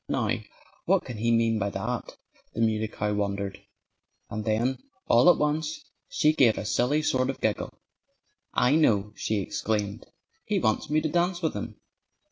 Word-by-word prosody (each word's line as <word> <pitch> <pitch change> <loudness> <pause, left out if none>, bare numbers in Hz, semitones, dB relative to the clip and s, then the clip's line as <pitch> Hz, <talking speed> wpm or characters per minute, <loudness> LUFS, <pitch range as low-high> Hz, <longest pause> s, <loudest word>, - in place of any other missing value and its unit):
"Now, - - 0 0.5
what - - +2
can 120 - -6
he 115 +2 0
mean 115 -1 +2
by 100 0 0
that?" 110 +5 -4 0.4
the 115 - -1
Muley 110 -1 +1
Cow 105 -1 -2
wondered. 100 -1 -2 0.7
And 110 +1 -3
then 115 +4 0 0.3
all 120 +9 +6
at - - +6
once 155 - -1 0.3
she 155 - +3
gave 125 -8 +4
a - - -4
silly 130 +8 +1
sort 130 -2 +1
of 135 - -3
giggle. - - -1 0.8
"I 125 +3 +3
know!" 105 -9 +2
she 110 -1 -1
exclaimed. 100 +1 -2 0.4
"He - - 0
wants - - 0
me 155 +1 +2
to 155 - 0
dance 175 +2 0
with 160 - +1
him!" - - -5
115 Hz, 165 wpm, -27 LUFS, 105-150 Hz, 0.8 s, all